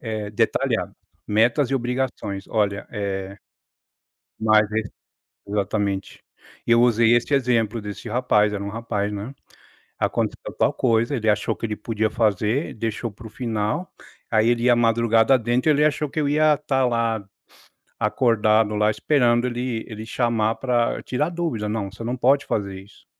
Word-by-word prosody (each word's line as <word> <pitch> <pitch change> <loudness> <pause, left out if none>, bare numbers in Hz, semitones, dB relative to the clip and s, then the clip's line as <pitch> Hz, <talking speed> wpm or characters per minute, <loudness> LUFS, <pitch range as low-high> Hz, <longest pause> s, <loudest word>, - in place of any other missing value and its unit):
eh, 110 -3 -4
detalhado. 105 - 0 0.3
Metas 115 +5 +2
e - - +1
obrigações. 125 -6 -2
Olha, 100 -2 -1
eh 100 -2 -4 1.0
Mas 110 -1 +4
e 110 +1 0 0.7
exatamente. 100 -1 -2 0.4
Eu 120 0 +5
usei 115 -1 +4
esse 120 +4 -1
exemplo, 120 -4 +1
desse 105 +3 -7
rapaz, 105 -3 +2
era 100 -1 -3
um 100 - -4
rapaz, 105 -2 -3
né. 105 +7 -6 0.6
"Aconteceu - - -2
tal - - +3
coisa, 115 +1 +1
ele 110 -2 -1
achou 105 -1 +1
que 115 - -3
ele 105 - -4
podia 110 +1 -1
fazer, 110 - 0
deixou 115 +1 -3
para 110 +3 -13
o 110 - -10
final. 115 - -3 0.4
Aí 110 0 +3
ele 120 -1 +1
ia 125 -1 +5
madrugada 115 +1 +3
adentro, 125 +4 +1
ele 150 0 +3
achou 150 0 +1
que 155 - -3
eu 145 - +1
ia 150 +1 +4
estar 135 -3 0
lá, 115 -3 0 0.8
acordado 110 -3 +2
lá, 105 0 +3
esperando 120 0 +2
ele 120 -2 -3
ele 110 0 -8
chamar 115 -2 0
para 120 -3 0
tirar 150 +6 -1
dúvida. 160 -12 -3
Não, 105 -3 -3
você 105 +2 -9
não 120 +2 -3
pode 135 +3 +3
fazer 100 -2 -3
isso". 100 - -20
115 Hz, 155 wpm, -23 LUFS, 105-125 Hz, 1.0 s, Eu